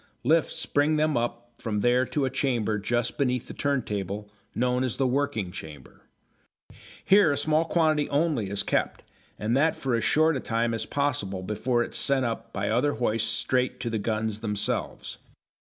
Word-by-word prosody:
Lifts 160 +4 +1
bring 145 +2 +2
them 155 -1 +1
up 120 0 -3
from 105 -2 -2
there 125 +2 +3
to 140 +1 -1
a 130 - -2
chamber 120 -6 0
just 120 +5 -1
beneath 125 -3 0
the - - -7
turntable, 105 -7 -2 0.3
known 125 +1 +1
as 125 -3 -1
the 135 - +1
working 130 -7 0
chamber. 75 -6 -10 1.0
Here 195 -5 +6
a 140 - 0
small 155 +1 +2
quantity 155 -3 +2
only 145 - 0
is 100 0 0
kept, - - -1 0.3
and 110 +3 0
that 155 +4 +3
for 130 -2 -2
as 115 -1 +1
short 155 +7 +3
a - - -1
time 115 -1 -1
as 115 - -3
possible 110 -10 -1
before 120 +4 0
it - - -7
is - - +1
sent 135 -2 +2
up 115 -1 -4
by 100 +1 -2
other 125 +6 +2
hoists 110 -1 0
straight 125 +3 0
to 120 - -3
the 110 - -1
guns 110 0 -2
themselves. 105 -2 -3
120 Hz, 180 wpm, -26 LUFS, 110-145 Hz, 1.0 s, Here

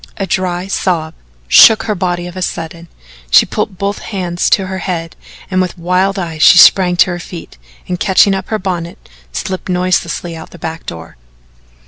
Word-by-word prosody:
A 195 - -2
dry 180 0 -2
sob 170 -4 -2 0.3
shook 220 - +7
her 215 - -1
body 175 -2 -2
of 175 0 -9
a 185 - -6
sudden, 170 -1 -5 0.4
she - - +6
put 185 - -4
both 200 +2 -2
hands 180 -4 -2
to 195 - +2
her 190 0 -5
head 170 -3 -4 0.4
and 185 0 +1
with 180 0 -3
wild 180 +3 0
eyes 165 -4 -5
she 180 - +7
sprang 180 -1 +6
to 180 - +4
her 175 - -4
feet 170 - -10 0.3
and, 180 -1 -3
catching 195 +1 +3
up 190 -1 -4
her 220 - -1
bonnet, 175 -3 -4 0.3
slipped 185 - -5
noiselessly 180 -1 -1
out 160 - -10
the - - -13
back 160 0 -7
door. 80 -3 -9
180 Hz, 180 wpm, -14 LUFS, 170-190 Hz, 0.4 s, shook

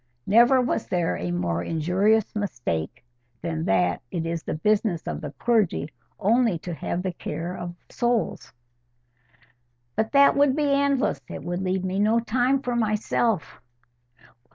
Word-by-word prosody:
Never 240 +5 +5
was 250 - -1
there 175 -2 0
a 90 - -4
more 85 -1 -1
injurious 185 - +1
mistake 120 - -3 0.4
than 160 -1 -2
that 90 -2 +1
it 165 +2 -3
is 165 0 -2
the - - -4
business 200 0 +1
of - - -4
the 150 - -5
clergy 210 -10 +1 0.3
only 225 -2 +3
to 175 +2 -6
have 175 +2 -3
the 185 - -1
care 170 +2 -5
of 175 0 -6
souls." 240 -2 -1 1.4
"But 220 0 0
that 280 0 +6
would 280 -2 +4
be 295 -2 +1
endless. 280 - +1
It - - -7
would 175 +1 -3
leave 185 0 -1
me 185 +1 -1
no 215 +3 +3
time 250 +4 +1
for 245 -1 -1
myself." 215 -4 0
195 Hz, 150 wpm, -25 LUFS, 165-235 Hz, 1.4 s, that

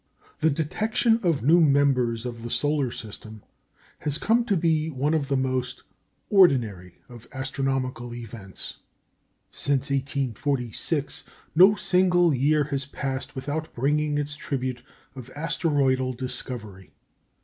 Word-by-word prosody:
The 160 - +3
detection 215 +9 +1
of 165 - +1
new 165 +6 +6
members 135 -6 +2
of 120 -2 -5
the 120 - -6
solar 145 0 +1
system 110 -1 -9 0.6
has 150 -1 -2
come 230 +6 +2
to 205 -5 +1
be 160 -1 +1
one 145 +1 0
of 150 -3 0
the 140 -1 +1
most 130 -1 -2 0.5
ordinary 115 - +3
of 120 -2 -13
astronomical 130 -2 -2
events. 110 -5 -8 0.7
Since 140 0 -1
1846 140 +1 -2 0.3
no 190 +6 +7
single 180 -4 +3
year 145 +3 +3
has 140 -1 -3
passed 135 -1 -4
without 145 +4 -4
bringing 150 +3 +1
its 145 0 -2
tribute 130 -4 -3 0.3
of 130 -1 -9
asteroidal 145 -5 +1
discovery. 115 -6 -7
140 Hz, 120 wpm, -25 LUFS, 125-155 Hz, 0.7 s, no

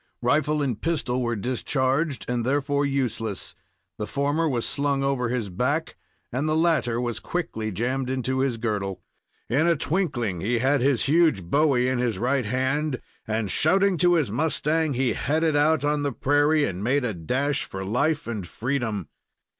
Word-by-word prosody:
Rifle 150 +3 +2
and 120 -6 -2
pistol 145 -7 -1
were 120 -1 0
discharged, 130 +5 -1
and, 120 -1 -1
therefore, 140 +2 +1
useless. 120 -6 -2 0.5
The 105 - -3
former 145 +3 0
was 120 -4 -1
slung 140 -1 0
over 135 -3 0
his 120 -5 -2
back, 135 - -1 0.4
and 140 +5 -1
the 155 - +2
latter 160 -8 +2
was 120 -2 -2
quickly 110 -11 -3
jammed 125 +6 -2
into 130 0 -1
his 130 -3 0
girdle. 105 -4 -3 0.4
In 140 +8 +2
a 170 - +4
twinkling 135 - -1
he 120 +4 +1
had 135 +3 +2
his 130 -3 +2
huge 155 - +3
bowie 130 - +2
in 130 -1 0
his 120 -5 0
right 125 +3 0
hand, 130 +4 0 0.3
and, 110 -2 -1
shouting 190 +4 +3
to 175 0 +4
his 150 -10 +1
mustang, 155 +3 +1
he 130 0 +1
headed 155 +1 0
out 145 0 +3
on 150 0 +1
the 145 -1 0
prairie, 145 +4 +2
and 95 +1 -4
made 130 +3 +1
a 115 - -1
dash 130 - -1
for 95 0 -6
life 145 +9 0
and 105 -6 -4
freedom. 110 - -2
130 Hz, 170 wpm, -25 LUFS, 120-150 Hz, 0.5 s, a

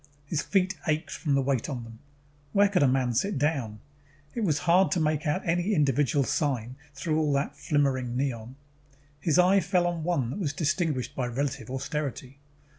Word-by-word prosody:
His 150 +1 -1
feet 190 -1 +1
ached 155 0 0
from 145 -4 -1
the 135 - +2
weight 130 -2 0
on 125 -5 -4
them. 115 -1 -12 0.5
Where 200 0 +5
could 195 -5 +2
a 140 - +5
man 130 -1 +1
sit 195 - 0
down? 130 -8 -1 0.5
It - - -4
was 155 -7 +2
hard 180 +3 +4
to 180 - +1
make 155 -1 0
out 160 +5 -1
any 175 +5 +1
individual 145 -2 +2
sign 130 -4 -1 0.2
through 155 +3 0
all 150 -2 +1
that 140 +1 -1
flimmering 135 -4 0
neon. 125 -2 -3 0.6
His 155 +2 +1
eye 185 +2 +5
fell 180 -2 +1
on 170 -2 -2
one 145 -9 0
that 195 - -5
was 150 -7 -1
distinguished 155 -3 -1
by 125 -2 -1
relative 125 -2 -3
austerity. 135 0 -4
145 Hz, 185 wpm, -27 LUFS, 130-170 Hz, 0.6 s, Where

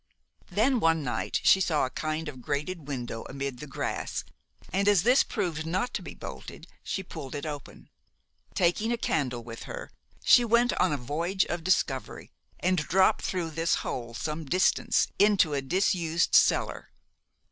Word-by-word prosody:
"Then 245 +4 +2
one 165 -4 +2
night 125 -4 -1
she 190 - +6
saw 155 -6 +2
a 130 - -6
kind 155 +1 -3
of 130 -4 -7
grated 145 +4 -3
window 120 -5 -4
amid 135 -2 -4
the 150 - -7
grass, 135 - -3 0.5
and 200 +2 +1
as 200 -5 +5
this 250 +3 +5
proved 175 -7 -2
not 185 +9 -1
to - - -2
be - - -9
bolted, - - -9 0.2
she 190 - -3
pulled 155 -6 -8
it 145 - -4
open. 145 -3 -8 0.7
Taking 185 +6 +2
a 240 - 0
candle 130 - -1
with 115 -1 -9
her, - - -7 0.3
she 245 - +7
went 235 +1 +3
on - - +3
a 145 - 0
voyage 165 +9 -1
of 175 -1 -4
discovery, 160 -7 -1 0.3
and 185 0 +2
dropped 185 +5 +3
through 175 -4 -2
this 165 +1 +1
hole 120 -2 -4
some 155 +5 -3
distance 180 +6 +2
into 200 -6 +4
a 140 - 0
disused 170 +1 +1
cellar. - - +3
165 Hz, 165 wpm, -28 LUFS, 140-190 Hz, 0.7 s, she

